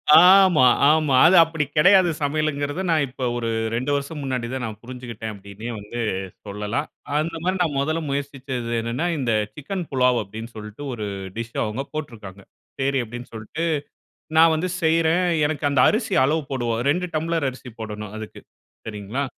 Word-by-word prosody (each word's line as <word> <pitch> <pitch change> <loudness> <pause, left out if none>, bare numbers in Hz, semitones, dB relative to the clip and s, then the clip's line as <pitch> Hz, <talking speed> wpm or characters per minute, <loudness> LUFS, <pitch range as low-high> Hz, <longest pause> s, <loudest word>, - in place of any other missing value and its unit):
ஆமா, 180 -5 +7 0.2
ஆமா. 155 -3 +3
அத 180 +3 +6
அப்பிடி 160 -2 -2
கெடையாது. 185 +2 +6
சமையலுங்கிறது, 145 +2 -1
நான் 155 -3 +3
இப்ப 130 +1 -8
ஒரு 115 -1 -2 0.3
2 130 +4 -1
வருஷம் 140 +2 -4
முன்னாடி 130 -3 -2
தான் 130 -2 -3
நான் 110 -2 -6
புரிஞ்சுக்கிட்டேன், 120 -3 -7
அப்பிடீன்னே 100 +4 -8
வந்து 105 +4 -7 0.5
சொல்லலாம். 105 +8 -3 0.3
அந்தமாரி 165 +4 -1
நான் 150 -5 0
மொதல்ல 155 +4 0
முயற்சிச்சது 135 -4 -4
என்னன்னா, 120 +9 -2
இந்த 125 -4 0 0.2
சிக்கன் 175 +4 -5
புலாவ் 125 -2 +3
அப்பிடீன்னு 110 +3 -8
சொல்ட்டு 105 +6 -8
ஒரு 110 -3 -4 0.3
டிஷ் 115 0 -5
அவுங்க 110 +6 -3
போட்ருக்காங்க. 110 -10 -7 0.4
சரி 135 0 +1
அப்பிடீன்னு 120 +2 -9
சொல்ட்டு, 110 +9 -5 0.7
நான் 165 0 +7
வந்து 175 +4 -1
செய்றேன். 165 +2 +3 0.2
எனக்கு 150 -1 -2
அந்த 135 -3 +3
அரிசி 215 -2 0
அளவு 155 +3 +1
போடுவோம். 120 -3 -1
2 180 +4 0
டம்ளர் 160 -2 0
அரிசி 125 0 -12
போடணும். 105 -1 -6
அதுக்கு, 110 -1 -8 0.5
சரிங்களா! 110 +6 -3
135 Hz, 150 wpm, -23 LUFS, 115-160 Hz, 0.7 s, ஆமா